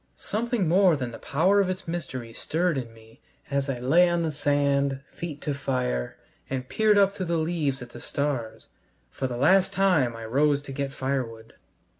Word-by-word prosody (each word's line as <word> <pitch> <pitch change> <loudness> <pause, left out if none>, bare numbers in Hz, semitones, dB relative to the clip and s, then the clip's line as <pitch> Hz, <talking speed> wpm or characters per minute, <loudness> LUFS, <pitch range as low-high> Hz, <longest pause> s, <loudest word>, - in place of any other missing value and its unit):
Something 230 -3 -1
more 180 0 +5
than 125 -4 -4
the 115 - -9
power 185 +8 +3
of 190 - 0
its 185 -1 -4
mystery 130 -9 -5
stirred 170 +7 0
in 125 -4 -4
me 110 0 -19 0.3
as 140 0 0
I 135 - -1
lay 160 +9 +4
on 170 -1 0
the 160 - -1
sand, 140 -2 +1
feet 155 -4 -7
to 145 - -2
fire, 125 - -2 0.3
and 130 -1 -3
peered 215 +4 +3
up 200 -1 +5
through 190 -2 -5
the 170 0 +1
leaves 155 -5 -1
at 120 - -12
the - - -10
stars. 140 -6 -3 0.4
For 130 - -3
the 120 -1 -4
last 185 +8 +4
time 170 -11 +2
I 115 0 -7
rose 145 +4 +2
to 140 - -8
get 135 0 -3
firewood. 125 -5 -4
140 Hz, 190 wpm, -26 LUFS, 130-175 Hz, 0.4 s, more